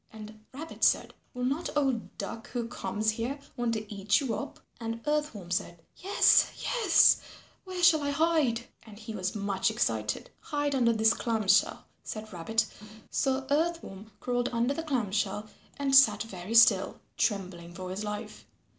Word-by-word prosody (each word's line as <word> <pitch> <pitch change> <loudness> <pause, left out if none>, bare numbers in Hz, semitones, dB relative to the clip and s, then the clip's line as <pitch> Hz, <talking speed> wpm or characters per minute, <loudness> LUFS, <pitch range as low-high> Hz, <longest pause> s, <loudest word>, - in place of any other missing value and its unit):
And 215 0 -11
Rabbit 315 +5 -8
said, - - +3 0.2
"Will 250 0 -2
not 280 +7 -1
old 265 -6 -1
Duck 225 - -6
who 240 -2 -3
comes 220 -2 -1
here 235 +6 -3 0.2
want 240 -1 -1
to 215 -1 -5
eat 200 +1 +2
you 265 -6 -2
up?" - - -6 0.2
And 230 0 -4
Earth 300 -2 0
Worm 180 -4 -9
said, 175 -1 -2 0.2
"Yes, 390 +3 +4
yes, 425 -9 +4 0.4
where 370 -1 -5
shall 330 -3 +6
I 285 - -1
hide?" 285 -6 +1 0.2
and 215 -2 -14
he 220 +1 -8
was 190 -1 -3
much 200 -2 0
excited. - - -2
"Hide 290 -1 -2
under 240 -3 +3
this 220 +1 +4
clam 225 -4 -2
shell," - - +3 0.2
said 215 -1 -7
Rabbit. 220 +6 0 0.5
So 265 0 0
Earth 335 +3 +1
Worm 195 +3 -10
crawled 245 -1 -1
under 240 +3 +1
the 325 - -4
clam 255 -11 -2
shell 205 +1 -1 0.3
and 275 -1 -1
sat 225 -7 +6
very 200 0 -6
still, 225 -1 +5 0.2
trembling 180 -5 -2
for 185 0 -6
his 195 +3 -4
life. 210 0 -6
230 Hz, 170 wpm, -29 LUFS, 210-280 Hz, 0.5 s, shall